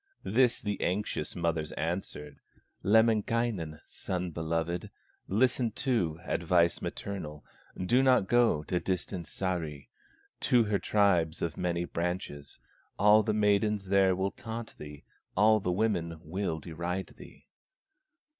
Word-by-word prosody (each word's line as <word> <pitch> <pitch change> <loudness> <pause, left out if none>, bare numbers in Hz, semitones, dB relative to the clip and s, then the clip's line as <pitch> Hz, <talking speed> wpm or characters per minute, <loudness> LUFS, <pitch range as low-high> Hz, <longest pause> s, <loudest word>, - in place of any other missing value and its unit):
This 120 +3 +3
the 105 -2 -3
anxious 100 +4 -1
mother's 85 -3 -1
answer: 80 -3 -4 0.4
"Lemminkainen, 110 -5 +2
son 90 -1 -4
beloved, 80 +2 -2 0.4
Listen 120 +3 +2
to 90 - 0
advice 85 0 +2
maternal: 75 -7 -6 0.3
Do 120 +8 +2
not 130 -7 +4
go 120 -10 +3
to 90 +3 -1
distant 90 -2 -3
Sahri, 85 -7 -3 0.5
To 120 -2 +4
her 105 -2 0
tribe 90 -5 +2
of 85 - -2
many 85 -1 -1
branches; 85 -5 -4 0.4
All 105 +2 +6
the 110 0 0
maidens 105 -1 +2
there 95 -1 +4
will 95 +1 -1
taunt 115 0 -7
thee, 75 -1 -9 0.3
All 110 +2 +5
the 90 -3 -1
women 90 -5 0
will 85 0 -3
deride 85 +4 -4
thee." - - -14
95 Hz, 120 wpm, -30 LUFS, 85-105 Hz, 0.5 s, All